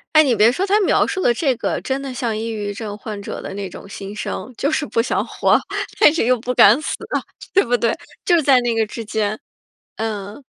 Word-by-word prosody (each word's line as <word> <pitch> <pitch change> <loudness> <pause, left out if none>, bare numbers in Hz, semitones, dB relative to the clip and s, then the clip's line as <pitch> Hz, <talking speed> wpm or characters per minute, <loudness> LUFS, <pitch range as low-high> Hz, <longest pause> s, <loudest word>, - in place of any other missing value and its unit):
哎， 310 - +9
你 260 -6 +3
别 220 +3 +5
说 365 +9 -2
他 410 +2 +3
描 - - +3
述 375 - -3
的 240 - +4
这 265 0 +1
个， - - -2
真 265 +1 -2
的 270 -2 -6
像 235 -4 -2
抑 225 - -3
郁 205 -2 -3
症 205 0 -6
患 210 0 -7
者 200 - -6
的 - - -7
那 200 -1 -4
种 195 - -11
心 200 +1 -7
声， 250 +3 -5
就 280 - 0
是 315 -1 0
不 230 - 0
想 - - -1
活， - - +2 0.4
但 300 - +7
是 330 - +1
又 250 0 +3
不 250 +2 -3
敢 230 +4 +7
死， 310 - -3 0.6
对 390 - +4
不 245 - +1
对？ 235 0 +1 0.3
就 345 -2 +4
在 265 -3 +5
那 240 -1 0
个 225 -1 +2
之 225 +2 -7
间， 215 0 -2 0.6
嗯。 215 +3 -5
230 Hz, 250 characters per minute, -20 LUFS, 210-270 Hz, 0.6 s, 哎